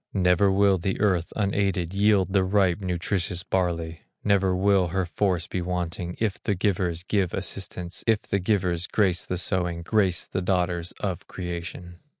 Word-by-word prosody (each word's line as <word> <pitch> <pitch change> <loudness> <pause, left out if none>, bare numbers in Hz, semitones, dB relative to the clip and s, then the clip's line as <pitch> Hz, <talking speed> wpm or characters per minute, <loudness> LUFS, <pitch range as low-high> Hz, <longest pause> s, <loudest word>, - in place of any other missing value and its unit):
Never 90 +1 +4
will 100 -1 +4
the 95 +3 -2
earth 90 -5 +1
unaided, 100 -4 0
Yield 100 -1 +3
the 95 -2 +4
ripe 95 -2 +2
nutritious 90 -1 -2
barley; 85 -3 -1 0.2
Never 95 -2 +2
will 95 -1 +3
her 95 +2 -1
force 90 -1 0
be 90 - -3
wanting, 90 0 -3
If 110 -4 -1
the 105 - 0
givers 90 -3 0
give 95 -2 0
assistance, 95 -2 -4
If 110 -2 +3
the 100 - -1
givers 90 -3 0
grace 95 -4 +1
the 90 - -2
sowing, 90 -2 -1
Grace 95 -3 +1
the 95 - -3
daughters 90 -2 0
of 95 -4 -3
creation. 90 -1 -6
90 Hz, 155 wpm, -25 LUFS, 90-100 Hz, 0.2 s, Never